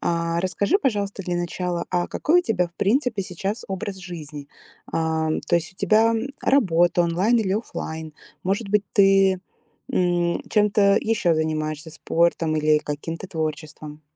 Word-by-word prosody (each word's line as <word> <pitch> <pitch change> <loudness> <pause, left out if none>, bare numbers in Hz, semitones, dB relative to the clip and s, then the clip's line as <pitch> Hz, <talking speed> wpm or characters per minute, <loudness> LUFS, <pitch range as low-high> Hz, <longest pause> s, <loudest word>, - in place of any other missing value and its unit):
А, 170 0 0
расскажи, 200 - +1
пожалуйста, 205 - -1
для 175 0 -2
начала, 175 0 -3
а 175 -1 0
какой 350 +4 +2
у - - -11
тебя, 180 - 0
в 170 - -34
принципе, 220 - +1
сейчас 195 +5 -4
образ 195 +1 -4
жизни? 155 -6 -8 0.4
Ам, 160 -1 0
то 155 - -1
есть 170 +3 -3
у - - -33
тебя, 225 +1 +3 0.3
работа 175 -9 +3
онлайн 185 +8 +2
или 195 -4 0
офлайн? 160 -7 -5 0.3
Может 200 +3 -1
быть, 210 0 +2
ты, 195 -1 +4 0.5
м, 175 -1 +1
чем-то 205 -1 +4
еще 215 -7 +1
занимаешься, 155 0 -2
спортом 165 -1 0
или 155 0 +3
каким-то 160 +5 -5
творчеством? 155 -2 -5
175 Hz, 145 wpm, -23 LUFS, 160-200 Hz, 0.5 s, ты